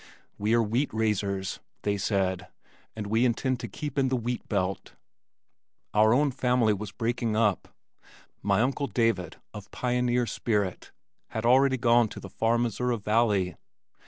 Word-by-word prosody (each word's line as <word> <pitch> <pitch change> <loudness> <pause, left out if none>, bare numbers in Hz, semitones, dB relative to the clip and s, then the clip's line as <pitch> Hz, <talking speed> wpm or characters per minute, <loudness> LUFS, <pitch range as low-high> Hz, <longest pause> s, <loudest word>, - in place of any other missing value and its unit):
"We 105 +3 +2
are 115 - +3
wheat 120 +7 0
raisers," 100 -3 -1 0.2
they 100 0 +1
said, 95 -3 -1 0.5
"and 110 -2 -5
we 110 +4 +1
intend 125 +1 +1
to 120 - -5
keep 145 +6 -4
in 135 - +3
the 130 - +1
wheat 120 0 -3
belt." 95 -2 -2 1.0
Our 110 +1 +5
own 140 +4 +3
family 125 -3 +2
group 100 - -1
was 105 -1 -6
breaking 115 -1 -1
up. 105 -3 +1 0.7
My 100 +1 +2
uncle 135 +3 0
David 115 -8 0 0.2
of 100 -2 -9
pioneer 125 0 0
spirit 105 -4 -2 0.4
had 110 0 -4
already 130 +2 +5
gone 120 -1 +4
to - - -9
the - - -9
far 115 +1 +1
Missouri 120 +1 0
Valley. 105 -4 +1
115 Hz, 155 wpm, -27 LUFS, 105-125 Hz, 1.0 s, Our